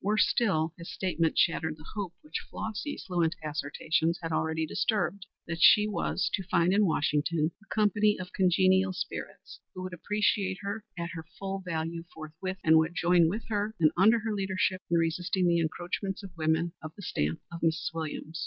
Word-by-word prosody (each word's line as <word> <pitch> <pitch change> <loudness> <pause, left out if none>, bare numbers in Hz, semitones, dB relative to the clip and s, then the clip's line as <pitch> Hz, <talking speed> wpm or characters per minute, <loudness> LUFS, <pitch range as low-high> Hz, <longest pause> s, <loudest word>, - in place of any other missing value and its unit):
Worse 210 +2 +3
still, 165 -8 +1
his 170 - -7
statement 170 -4 0
shattered 160 -2 +2
the 155 - -14
hope, 195 -5 -4
which 300 - -5
Flossy's 220 +7 -4
fluent 175 -2 +1
assertions 155 +3 0
had 165 -1 -4
already 160 0 0
disturbed, 200 +2 -1 0.2
that 165 0 -4
she 210 +2 +7
was 200 -2 -1
to - - +1
find 180 -1 +2
in 205 0 +4
Washington 155 0 +1
a 215 - -22
company 210 0 +3
of 180 0 -7
congenial 190 +1 +3
spirits 180 - -6 0.2
who 185 - -5
would 185 0 -6
appreciate 200 +1 0
her 205 +2 -4
at 170 0 -3
her 165 -1 -6
full 195 0 -3
value 165 -1 -3
forthwith, 160 +5 -6
and 160 0 +6
would 160 +2 0
join 175 -1 +4
with 215 +6 -3
her 210 0 -1
and 155 -2 +5
under 215 +6 +5
her 220 0 -2
leadership 190 -1 0
in 170 - +3
resisting 175 +3 0
the 170 -1 +3
encroachments 180 +5 -3
of 185 -3 -10
women 160 +1 +1
of 155 +1 -8
the 200 - -10
stamp 75 - -1
of 170 - -6
Mrs. 165 0 0
Williams. 160 0 -5
175 Hz, 180 wpm, -29 LUFS, 160-195 Hz, 0.2 s, she